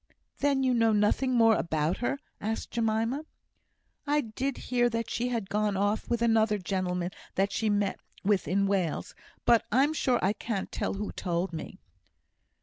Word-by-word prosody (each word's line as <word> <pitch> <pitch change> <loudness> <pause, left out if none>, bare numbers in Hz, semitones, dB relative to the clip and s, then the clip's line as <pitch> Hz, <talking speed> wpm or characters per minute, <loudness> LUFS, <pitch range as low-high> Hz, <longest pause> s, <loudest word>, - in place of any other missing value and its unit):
"Then 280 -2 +2
you 255 -1 +3
know 230 -2 +3
nothing 215 +5 +2
more 225 -1 +6
about 160 -1 0
her?" 245 +3 -1 0.2
asked 220 +2 -3
Jemima. 230 +4 0 0.8
"I 295 +1 +3
did 260 +3 -3
hear 240 -1 +1
that 230 -1 -3
she 240 +2 -1
had 230 -5 -2
gone 210 0 0
off 205 +2 0
with 235 -1 +1
another 220 -2 +3
gentleman 180 -2 -2 0.2
that 195 +1 +1
she 220 +1 0
met 205 -1 0 0.2
with 195 -5 +2
in 200 +5 +2
Wales, 190 -5 -1 0.3
but 235 -2 +5
I'm 275 +7 +3
sure 255 -5 +2
I 195 - +2
can't 210 -2 -4
tell - - -2
who 205 +1 -4
told 175 0 -2
me." 160 - -6
220 Hz, 165 wpm, -29 LUFS, 195-240 Hz, 0.8 s, more